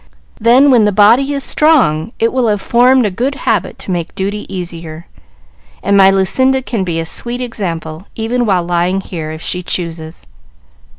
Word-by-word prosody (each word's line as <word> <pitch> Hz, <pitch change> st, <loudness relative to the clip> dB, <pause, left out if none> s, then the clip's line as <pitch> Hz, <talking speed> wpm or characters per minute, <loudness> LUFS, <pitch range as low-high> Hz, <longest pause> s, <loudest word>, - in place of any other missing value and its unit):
Then, 250 Hz, +5 st, +5 dB
when 235 Hz, -4 st, +4 dB
the 210 Hz, -, +2 dB
body 230 Hz, +8 st, +4 dB
is 280 Hz, -1 st, -2 dB
strong, 230 Hz, -, +2 dB
it 230 Hz, -, 0 dB
will 255 Hz, -2 st, +1 dB
have 210 Hz, -2 st, +1 dB
formed 250 Hz, +4 st, +3 dB
a 205 Hz, -, -1 dB
good 255 Hz, +9 st, -2 dB
habit 220 Hz, -8 st, -2 dB
to -, -, -6 dB
make 175 Hz, -2 st, -4 dB
duty 200 Hz, +1 st, -4 dB
easier; 170 Hz, -3 st, -7 dB, 0.8 s
and 200 Hz, -, +2 dB
my 195 Hz, -1 st, +6 dB
Lucinda 260 Hz, +8 st, +1 dB
can 230 Hz, -6 st, -3 dB
be 170 Hz, -3 st, -2 dB
a 165 Hz, -, -3 dB
sweet 240 Hz, +8 st, -3 dB
example, 175 Hz, -8 st, -5 dB
even 235 Hz, +2 st, -1 dB
while 185 Hz, -3 st, +1 dB
lying 175 Hz, +2 st, 0 dB
here, 160 Hz, -5 st, -6 dB
if 160 Hz, +1 st, -8 dB
she 180 Hz, -, -2 dB
chooses." 165 Hz, -, -5 dB
200 Hz, 175 wpm, -14 LUFS, 175-245 Hz, 0.8 s, my